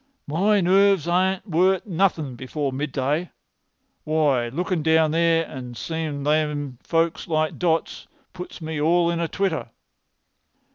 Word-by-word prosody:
"My 195 Hz, +7 st, +2 dB
nerves 195 Hz, -1 st, +3 dB
are 185 Hz, +2 st, +1 dB
worth 185 Hz, 0 st, +2 dB
nothin' 170 Hz, -, 0 dB
before 135 Hz, +2 st, -3 dB
midday. 145 Hz, +4 st, -2 dB, 0.7 s
Why, 150 Hz, -6 st, +1 dB
lookin' 175 Hz, +6 st, -2 dB
down 160 Hz, 0 st, +3 dB
there, 165 Hz, 0 st, +2 dB
and 125 Hz, -4 st, -8 dB
seem' 155 Hz, -2 st, -4 dB
those 150 Hz, -1 st, 0 dB
folks 165 Hz, 0 st, 0 dB
like 155 Hz, -2 st, -1 dB
dots, 165 Hz, -2 st, -1 dB, 0.3 s
puts 180 Hz, -1 st, -9 dB
me 155 Hz, -1 st, -4 dB
all 170 Hz, +2 st, +3 dB
in 170 Hz, -, -2 dB
a 170 Hz, -, 0 dB
twitter. 185 Hz, -8 st, -2 dB
160 Hz, 130 wpm, -23 LUFS, 150-180 Hz, 0.7 s, nerves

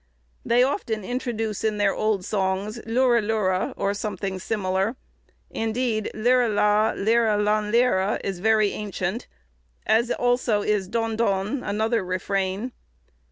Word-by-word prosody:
They 240 Hz, +2 st, +3 dB
often 235 Hz, -, -1 dB
introduce 225 Hz, -2 st, -3 dB
in 215 Hz, -1 st, 0 dB
their 205 Hz, -1 st, +2 dB
old 215 Hz, -4 st, 0 dB
songs 200 Hz, +2 st, -1 dB
"Lurelure," 225 Hz, -6 st, +1 dB
or 200 Hz, -, 0 dB
something 200 Hz, -2 st, -4 dB
similar; 195 Hz, +2 st, -1 dB, 0.6 s
indeed 225 Hz, -1 st, -1 dB
"Leire 245 Hz, +2 st, +3 dB
la, 210 Hz, +1 st, +3 dB
Leire 220 Hz, 0 st, +2 dB
lanleire," 210 Hz, 0 st, +2 dB
is 195 Hz, -3 st, -3 dB
very 215 Hz, 0 st, +3 dB
ancient, 205 Hz, +1 st, -4 dB, 0.6 s
as 230 Hz, +2 st, +3 dB
also 245 Hz, -4 st, +1 dB
is 205 Hz, -3 st, 0 dB
"Dondon," 225 Hz, 0 st, 0 dB
another 220 Hz, +1 st, 0 dB
refrain. 190 Hz, +4 st, -2 dB
215 Hz, 115 wpm, -24 LUFS, 195-230 Hz, 0.6 s, They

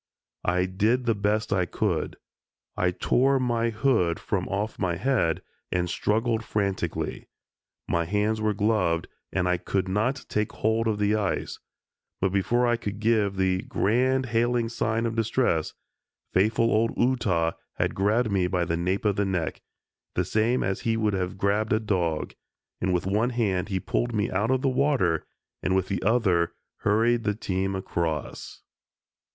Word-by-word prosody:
I 90 Hz, +1 st, +2 dB
did 110 Hz, +7 st, +1 dB
the 115 Hz, -, +3 dB
best 105 Hz, +1 st, 0 dB
I 90 Hz, -2 st, +1 dB
could. -, -, -1 dB, 0.6 s
I 90 Hz, -, +2 dB
tore 130 Hz, +9 st, +2 dB
my 120 Hz, -2 st, +1 dB
hood 110 Hz, -7 st, +1 dB
from 95 Hz, -3 st, -2 dB
off 105 Hz, +3 st, -3 dB
my 90 Hz, -3 st, 0 dB
head 105 Hz, -, +1 dB, 0.3 s
and 90 Hz, -1 st, 0 dB
struggled 115 Hz, +5 st, 0 dB
frantically. 100 Hz, -3 st, -2 dB, 0.6 s
My 85 Hz, 0 st, +1 dB
hands 105 Hz, +4 st, 0 dB
were 105 Hz, -1 st, +1 dB
gloved 100 Hz, -6 st, +1 dB, 0.2 s
and 90 Hz, -1 st, 0 dB
I 90 Hz, 0 st, +2 dB
could 95 Hz, +2 st, -1 dB
not 115 Hz, +8 st, 0 dB
take 105 Hz, 0 st, -1 dB
hold 110 Hz, +1 st, +1 dB
of 110 Hz, -2 st, +1 dB
the 105 Hz, 0 st, +2 dB
ice, 105 Hz, -3 st, -1 dB, 0.6 s
but 95 Hz, 0 st, +1 dB
before 100 Hz, +6 st, +2 dB
I 120 Hz, -1 st, +2 dB
could 105 Hz, -3 st, -5 dB
give 110 Hz, -3 st, +2 dB
the 95 Hz, -1 st, +1 dB
"Grand 130 Hz, +5 st, +1 dB
Hailing 120 Hz, 0 st, +1 dB
Sigh 110 Hz, -1 st, -1 dB
of 115 Hz, 0 st, 0 dB
Distress," 115 Hz, -7 st, 0 dB, 0.6 s
faithful 110 Hz, +4 st, +3 dB
old 115 Hz, +2 st, +1 dB
Ootah 100 Hz, -10 st, +1 dB, 0.2 s
had -, -, 0 dB
grabbed 105 Hz, +3 st, +1 dB
me 95 Hz, -2 st, +2 dB
by 90 Hz, -1 st, 0 dB
the 85 Hz, 0 st, -1 dB
nape 90 Hz, +5 st, -1 dB
of 100 Hz, -2 st, +2 dB
the 100 Hz, -, +2 dB
neck, 90 Hz, -6 st, -2 dB, 0.5 s
the -, -, +1 dB
same 115 Hz, +3 st, +1 dB
as 95 Hz, 0 st, -1 dB
he 115 Hz, -1 st, 0 dB
would 110 Hz, -2 st, +1 dB
have 90 Hz, -1 st, -2 dB
grabbed 105 Hz, +3 st, +1 dB
a 110 Hz, -, +3 dB
dog, 90 Hz, -7 st, -1 dB, 0.5 s
and 95 Hz, -, +1 dB
with 90 Hz, 0 st, 0 dB
one 105 Hz, +5 st, +1 dB
hand 105 Hz, -6 st, 0 dB
he 95 Hz, -2 st, 0 dB
pulled 120 Hz, +5 st, -1 dB
me 105 Hz, -1 st, 0 dB
out 100 Hz, +5 st, 0 dB
of 130 Hz, 0 st, +1 dB
the -, -, +3 dB
water, 130 Hz, -, +1 dB, 0.3 s
and 95 Hz, -, +1 dB
with 95 Hz, -1 st, 0 dB
the 100 Hz, -, -1 dB
other 95 Hz, -6 st, +2 dB, 0.3 s
hurried 115 Hz, +3 st, +2 dB
the 105 Hz, -2 st, 0 dB
team 95 Hz, -2 st, -2 dB
across. 85 Hz, -5 st, -4 dB
105 Hz, 165 wpm, -26 LUFS, 95-115 Hz, 0.6 s, the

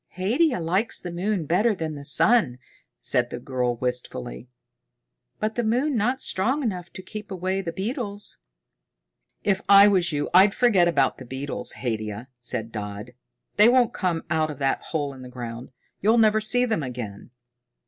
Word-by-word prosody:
"Haidia 245 Hz, -, +1 dB
likes 185 Hz, +7 st, +1 dB
the 175 Hz, -, -6 dB
moon 180 Hz, 0 st, -1 dB
better 205 Hz, +8 st, +2 dB
than 160 Hz, -3 st, -4 dB
the 145 Hz, -1 st, -8 dB
sun," 150 Hz, -, +3 dB, 0.4 s
said 120 Hz, 0 st, +1 dB
the 120 Hz, -, -6 dB
girl 125 Hz, -1 st, -1 dB
wistfully. 125 Hz, -, -4 dB, 0.9 s
"But 215 Hz, +1 st, -1 dB
the 240 Hz, -, -1 dB
moon 250 Hz, +6 st, +1 dB
not 245 Hz, +4 st, 0 dB
strong 260 Hz, +10 st, 0 dB
enough 180 Hz, -7 st, -3 dB
to 190 Hz, -, -9 dB
keep 215 Hz, +3 st, -8 dB
away 190 Hz, 0 st, -2 dB
the 170 Hz, -3 st, -4 dB
beetles." 205 Hz, -, -5 dB, 1.0 s
"If 195 Hz, -1 st, +1 dB
I 200 Hz, 0 st, +9 dB
was 185 Hz, -4 st, +3 dB
you, 145 Hz, -1 st, -1 dB
I'd 195 Hz, +2 st, +6 dB
forget 205 Hz, -8 st, +4 dB
about 140 Hz, -6 st, +1 dB
the 130 Hz, -, -9 dB
beetles, 135 Hz, +3 st, -4 dB
Haidia," 110 Hz, 0 st, -4 dB
said 115 Hz, -2 st, -4 dB
Dodd. 105 Hz, +2 st, -6 dB, 0.5 s
"They 210 Hz, +3 st, +7 dB
won't 245 Hz, -2 st, +3 dB
come 175 Hz, -4 st, -1 dB
out 155 Hz, -1 st, +1 dB
of 150 Hz, -, -6 dB
that 135 Hz, -1 st, 0 dB
hole 145 Hz, -3 st, -3 dB
in 130 Hz, -, -12 dB
the 125 Hz, -, -9 dB
ground. 120 Hz, -1 st, -7 dB, 0.3 s
You'll 220 Hz, +4 st, +4 dB
never 215 Hz, -1 st, +4 dB
see 245 Hz, +3 st, +1 dB
them 220 Hz, -8 st, -1 dB
again." 120 Hz, -6 st, -7 dB
175 Hz, 170 wpm, -24 LUFS, 130-215 Hz, 1.0 s, I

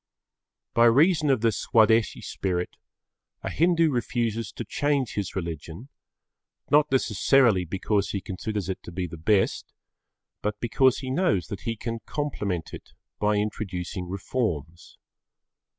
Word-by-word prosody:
By 115 Hz, -, +5 dB
reason 150 Hz, +6 st, +4 dB
of 130 Hz, -5 st, +3 dB
the 115 Hz, -1 st, +3 dB
Swadeshi 110 Hz, 0 st, +3 dB
spirit, 90 Hz, -2 st, -3 dB, 0.7 s
a -, -, -3 dB
Hindu 165 Hz, -1 st, +3 dB
refuses 115 Hz, -3 st, -1 dB
to -, -, -6 dB
change 145 Hz, -4 st, 0 dB
his 100 Hz, -4 st, -3 dB
religion, 85 Hz, -, -6 dB, 0.8 s
not 150 Hz, 0 st, +4 dB
necessarily 115 Hz, -4 st, +3 dB
because 100 Hz, +3 st, -1 dB
he 100 Hz, -, -2 dB
considers 100 Hz, 0 st, -4 dB
it 95 Hz, -, -4 dB
to -, -, -10 dB
be 90 Hz, +1 st, -3 dB
the 85 Hz, -, -7 dB
best, 95 Hz, +5 st, +1 dB, 0.7 s
but 105 Hz, 0 st, -2 dB
because 130 Hz, +2 st, +3 dB
he 130 Hz, -1 st, -4 dB
knows 130 Hz, -, +1 dB
that 100 Hz, -, -7 dB
he 115 Hz, -, -1 dB
can 115 Hz, +1 st, -4 dB
complement 105 Hz, -, -3 dB
it -, -, -10 dB, 0.3 s
by 105 Hz, 0 st, +2 dB
introducing 95 Hz, -4 st, -3 dB
reforms. 90 Hz, -, -3 dB
110 Hz, 135 wpm, -26 LUFS, 95-130 Hz, 0.8 s, By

